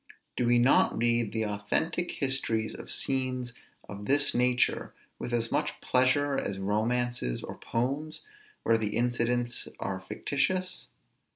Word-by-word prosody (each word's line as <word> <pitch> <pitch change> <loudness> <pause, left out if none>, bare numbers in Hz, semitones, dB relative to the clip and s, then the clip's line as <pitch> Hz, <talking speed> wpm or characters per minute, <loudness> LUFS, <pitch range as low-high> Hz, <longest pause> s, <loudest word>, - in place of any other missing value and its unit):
Do 120 - +1
we 120 0 +5
not 120 +3 +4
read 115 -2 +2
the 110 0 -1
authentic 105 +12 -1
histories 130 -5 0
of - - -9
scenes 130 -2 0 0.3
of 100 0 -7
this 145 +1 +3
nature 125 0 +2 0.2
with 120 - -4
as 115 -1 0
much 150 0 -1
pleasure 135 +2 +2
as 100 - -3
romances 110 - 0
or - - -6
poems, 140 +6 -2 0.4
where 115 0 +3
the 105 0 -1
incidents 120 0 0
are - - -3
fictitious? 185 -1 -1
120 Hz, 130 wpm, -29 LUFS, 115-135 Hz, 0.4 s, we